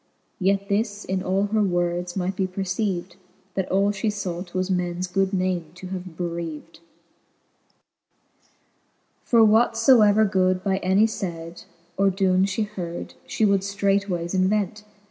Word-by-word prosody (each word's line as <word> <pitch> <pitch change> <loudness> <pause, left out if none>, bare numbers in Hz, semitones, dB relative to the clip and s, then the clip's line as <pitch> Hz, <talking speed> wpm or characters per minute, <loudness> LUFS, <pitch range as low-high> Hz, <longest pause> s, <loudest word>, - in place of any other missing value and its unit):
Yet 195 +1 +1
this 205 0 -1
in 190 0 -1
all 190 +2 0
her 215 -1 +2
words 175 -2 -1
might 190 0 -2
be 190 0 0
perceived. 185 -1 -3 0.4
That 190 -2 -2
all 200 +2 +2
fhe 205 +2 -1
fought, 185 -3 -5
was 185 +1 0
mens 180 0 -1
good 190 +1 0
name 185 -3 0
to 185 +1 -9
have 185 -3 -7
bereaved, 170 -2 -5 1.6
XXXIV. - - -36 0.8
For 230 -2 +5
what 220 +2 +4
ibever 220 -3 +5
good 185 -1 +1
by 190 -1 +1
any 190 +3 +3
layd, 170 -5 -5 0.3
Or 195 0 +4
doen 190 -1 +2
fhe 200 +2 -1
heard, 175 -5 -6
fhe 220 - +1
would 200 -1 +3
ftreightwayes 195 -3 -1
invent. 200 +2 0
190 Hz, 145 wpm, -24 LUFS, 180-200 Hz, 1.6 s, For